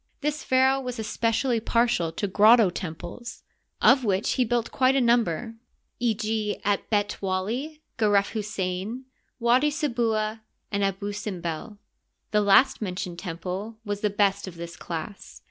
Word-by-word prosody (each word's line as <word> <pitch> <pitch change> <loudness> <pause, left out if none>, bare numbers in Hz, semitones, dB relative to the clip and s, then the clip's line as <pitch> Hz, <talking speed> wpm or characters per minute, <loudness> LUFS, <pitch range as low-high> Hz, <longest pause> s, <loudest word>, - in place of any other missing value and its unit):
This 300 +1 -2
pharaoh 265 +1 +3
was 250 -2 -5
espe 220 +1 -1
cially 230 0 0
partial 230 -10 +1
to 205 - -2
grotto 210 +1 +5
temples, 175 +8 -7 0.4
of 265 - +6
which 200 -2 +1
he 255 - +2
built 240 0 -1
quite 260 0 +3
a - - +4
number— 235 -3 +1 0.5
e. 235 -2 +1
g., 215 -1 -2
at 205 0 0
B^t 205 -1 0
Wally, 230 +12 -3 0.2
Geref 205 -2 +3
Hussein, 210 +2 -3 0.3
Widi 250 +5 +3
Se 300 0 -1
bua. 220 -2 -1 0.3
and 200 -1 0
Abusimbel. 195 -2 -4 0.5
The 210 - +3
last 205 +7 +4
mentioned 180 -3 -4
temple 185 +5 -5
was 205 0 -3
the 210 - +2
best'of 200 -2 0
this 170 0 -8
class. 170 +4 -7
215 Hz, 145 wpm, -26 LUFS, 195-240 Hz, 0.5 s, of